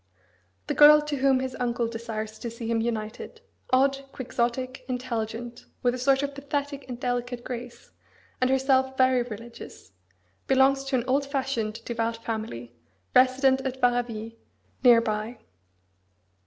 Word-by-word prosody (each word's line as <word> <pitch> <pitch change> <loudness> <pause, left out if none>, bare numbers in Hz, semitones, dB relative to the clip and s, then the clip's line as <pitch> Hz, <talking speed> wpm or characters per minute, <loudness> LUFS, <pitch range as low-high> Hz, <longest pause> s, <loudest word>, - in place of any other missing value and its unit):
The - - -2
girl 300 0 +8
to 300 -1 -3
whom 265 -1 +3
his 260 0 -4
uncle 235 -1 0
desires 220 -2 -5
to 235 - -4
see 230 0 -8
him 225 0 0
united 225 - -4 0.3
odd, 270 +1 +3
quixotic, 255 +1 -2
intelligent, 240 -2 -4 0.2
with 245 -1 +3
a 255 - -4
sort 270 +2 +3
of 285 0 -2
pathetic 280 0 -4
and 245 -1 -6
delicate 245 -1 -2
grace, 245 -1 -8 0.5
and 255 - +3
herself 265 0 +2
very 255 -1 +4
religious 235 - -9 0.6
belongs 270 +1 +4
to 270 -1 -1
an 245 - +1
old 275 +2 +1
fashioned, 265 -6 -2
devout 230 -1 -2
family,. 215 - -5 0.4
resident 265 +1 +4
at 265 -1 -4
Varaville, 240 -3 0 0.5
near 240 -2 +7
by. 220 +1 -3
250 Hz, 140 wpm, -26 LUFS, 230-265 Hz, 0.6 s, girl